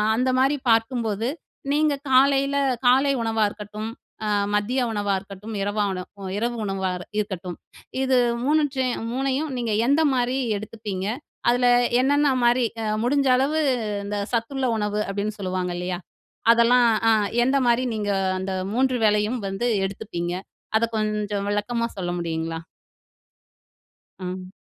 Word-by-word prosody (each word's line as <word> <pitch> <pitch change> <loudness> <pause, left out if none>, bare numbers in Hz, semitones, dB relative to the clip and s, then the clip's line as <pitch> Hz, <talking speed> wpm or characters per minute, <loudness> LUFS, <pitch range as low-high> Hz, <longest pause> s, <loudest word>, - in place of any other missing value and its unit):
அந்தமாரி 260 +3 +2
பார்க்கும்போது, 225 -1 +1 0.4
நீங்க 300 0 +3 0.2
காலையில 275 +1 +4 0.3
காலை 270 +3 +5
உணவா 225 -1 +1
இருக்கட்டும், 210 +1 -7 0.4
அ - - -1 0.3
மதிய 240 +6 +1
உணவா 205 -2 0
இருக்கட்டும், 200 +3 -9
இரவா 205 +1 0 0.4
அ - - -4
இரவு 240 +2 -1
உணவா 195 -1 -1 0.3
இருக்கட்டும். 185 -4 -3 0.5
இது 260 -1 +3 0.3
3 300 +4 +3
சே 260 -1 +1 0.3
3 270 +3 -1
நீங்க 230 -3 -1
எந்தமாரி 265 -3 +2 0.2
எடுத்துப்பீங்க? 205 -2 -5 0.4
அதில 245 +1 +3 0.4
என்னென்னமாரி 260 -3 +3 0.2
அ - - -2 0.2
முடிஞ்ச 275 +3 +2
அளவு 280 +4 +1 0.5
இந்த 205 0 -3 0.2
சத்துள்ள 250 +3 -1
உணவு 210 0 -1
அப்பிடின்னு 205 +2 -3
சொல்லுவாங்க 185 -2 -2
இல்லயா! 180 0 -3 0.5
அதெல்லாம் 235 +1 +5 0.2
அ - - +6 0.3
எந்தமாரி 255 -2 +3
நீங்க 210 -1 -2 0.3
அந்த 190 +1 -3 0.2
3 255 +1 +2
வேலையும் 210 +3 +2
வந்து 195 +5 -2 0.2
எடுத்துப்பீங்க? 190 -3 -4 0.4
அத 225 - 0
கொஞ்சம் 210 -1 -1
விளக்கமா 230 +3 -1
சொல்ல 175 -2 -2
முடியுங்களா? 165 -1 -3 1.6
ஆ. 185 0 -6
225 Hz, 120 wpm, -24 LUFS, 200-255 Hz, 1.6 s, அ